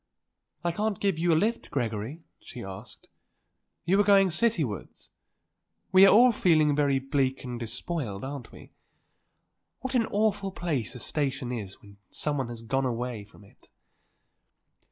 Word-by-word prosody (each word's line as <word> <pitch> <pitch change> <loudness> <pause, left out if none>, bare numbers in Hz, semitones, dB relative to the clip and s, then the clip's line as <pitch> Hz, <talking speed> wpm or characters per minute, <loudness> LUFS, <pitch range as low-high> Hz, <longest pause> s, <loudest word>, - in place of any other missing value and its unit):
"I 175 - +1
can't 210 +3 -2
give 195 -5 0
you 170 +1 +2
a - - +5
lift, 220 +7 0
Gregory?" 120 +4 -3 0.2
she 120 - -9
asked. 95 -1 -10 0.8
"You 190 +4 +3
are - - +6
going 195 -2 +5
citywards? 165 - -1 0.8
We 190 +1 +8
are - - +7
all 245 +4 +7
feeling 155 -8 +3
very 140 -2 +2
bleak 135 -1 -1
and 125 -2 -5
despoiled, 115 - -4
aren't 135 -2 -6
we? - - -14 1.1
What 260 +1 -4
an 235 -3 +2
awful 205 -2 0
place 145 - -2
a - - -7
station 135 -1 -2
is 105 -6 -6
when 100 -1 -16
someone 140 -5 -2
has 115 -1 -8
gone 135 +3 0
away 120 -3 -4
from 105 - -18
it." 100 - -22
145 Hz, 150 wpm, -28 LUFS, 120-190 Hz, 1.1 s, We